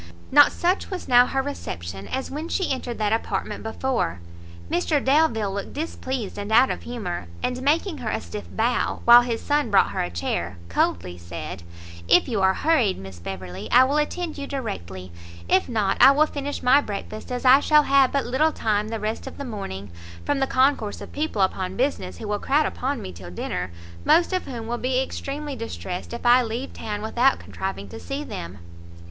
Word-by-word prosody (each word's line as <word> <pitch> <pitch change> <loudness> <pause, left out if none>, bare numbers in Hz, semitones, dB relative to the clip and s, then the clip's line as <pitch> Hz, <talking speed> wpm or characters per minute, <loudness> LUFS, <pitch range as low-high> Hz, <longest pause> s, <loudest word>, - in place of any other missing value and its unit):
Not 290 +1 +7
such 360 +3 0
was 375 -2 -5
now 245 -1 +6
her 270 0 -1
reception 95 - -6
as 265 0 -4
when 305 +4 -5
she 380 - 0
entered 250 -3 -3
that 215 0 +1
apartment 225 - -2
before; 220 - -2 0.5
Mr 180 - +1
Delvile 265 -8 +2
looked 200 0 -5
displeased 260 - -4
and 205 +1 -5
out 250 +4 +5
of - - -4
humour, 205 - -5 0.2
and, 250 0 -1
making 310 +4 +1
her 235 -3 -3
a - - -1
stiff 210 - -7
bow, 235 +3 0
while 240 +1 +10
his 235 -2 -2
son 290 -4 +1
brought 200 - +4
her - - -2
a 90 - -2
chair, 85 +1 -3
coldly 90 +1 -1
said, 85 0 -7 0.5
"If 180 - +5
you 220 -6 -1
are 190 0 +4
hurried, 270 -12 +2
Miss 95 -2 -10
Beverley, 95 +1 -7
I 250 +2 +7
will 275 +3 +1
attend 310 +1 -2
you 280 - -5
directly; 95 - -5 0.4
if 190 - +2
not, 210 -5 0
I - - +10
will 300 +2 +4
finish 285 -1 -5
my 265 +3 +6
breakfast, 215 0 -6
as 250 +1 -3
I 260 +2 +8
shall 300 +1 +5
have 275 -2 +4
but 280 -1 0
little 285 +6 +2
time 215 -6 0
the 225 0 -4
rest 215 +1 -3
of - - -9
the 280 - -5
morning, 100 - -6 0.3
from 285 - 0
the 270 - +1
concourse 260 -6 +1
of - - -9
people 290 -10 0
upon 190 0 -2
business, 270 +4 -1
who 220 - -7
will 205 0 -1
crowd 295 +3 +2
upon 270 +2 -2
me 95 - -6
till 85 0 -10
dinner, 90 +1 -4 0.3
most 345 - +4
of 370 - -1
whom 235 -4 -6
will 240 +1 -3
be 255 0 +1
extremely 280 +2 -4
distressed 190 -6 -6
if 235 +1 -7
I 245 +1 +7
leave 240 +3 -4
town 210 -1 -5
without 245 +4 +3
contriving 190 0 -5
to 225 - -8
see 275 +2 -4
them." 90 - -7
240 Hz, 200 wpm, -24 LUFS, 195-275 Hz, 0.5 s, while